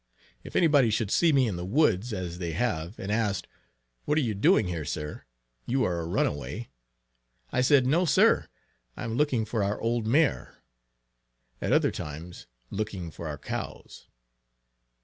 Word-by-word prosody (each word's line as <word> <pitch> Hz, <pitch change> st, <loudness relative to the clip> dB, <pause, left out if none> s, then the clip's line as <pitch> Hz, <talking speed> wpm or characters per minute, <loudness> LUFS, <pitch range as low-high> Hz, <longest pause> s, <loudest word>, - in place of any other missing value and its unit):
If -, -, -11 dB
any 175 Hz, -, +5 dB
body 145 Hz, -7 st, +5 dB
should 110 Hz, -1 st, 0 dB
see 170 Hz, -2 st, +4 dB
me 135 Hz, -4 st, +4 dB
in 95 Hz, -5 st, -2 dB
the 90 Hz, -, -4 dB
woods, 115 Hz, -, +2 dB
as 90 Hz, -4 st, -4 dB
they 85 Hz, -2 st, -3 dB
have, 95 Hz, -3 st, -2 dB
and 95 Hz, +2 st, -4 dB
asked 105 Hz, -3 st, 0 dB, 0.6 s
"what 150 Hz, -, +1 dB
are -, -, +4 dB
you 115 Hz, -6 st, 0 dB
doing 100 Hz, +1 st, +4 dB
here 85 Hz, -3 st, -3 dB
sir! 75 Hz, +1 st, -5 dB, 0.4 s
you 130 Hz, +2 st, +1 dB
are 85 Hz, -1 st, 0 dB
a 80 Hz, -, -4 dB
runaway!" 75 Hz, -, -2 dB, 0.8 s
I 125 Hz, -, +1 dB
said, 130 Hz, 0 st, +5 dB
"no, 165 Hz, +8 st, +3 dB
sir, 150 Hz, -, +4 dB, 0.5 s
I -, -, -5 dB
am 115 Hz, -1 st, -3 dB
looking 130 Hz, -5 st, +1 dB
for 110 Hz, -1 st, -2 dB
our 100 Hz, +2 st, -1 dB
old 115 Hz, -1 st, -1 dB
mare;" 140 Hz, -, +1 dB, 1.0 s
at -, -, -1 dB
other -, -, +4 dB
times, 80 Hz, +4 st, -8 dB, 0.2 s
"looking 100 Hz, -5 st, -4 dB
for 85 Hz, -, -7 dB
our 75 Hz, -1 st, -4 dB
cows." -, -, -7 dB
110 Hz, 170 wpm, -28 LUFS, 85-125 Hz, 1.0 s, any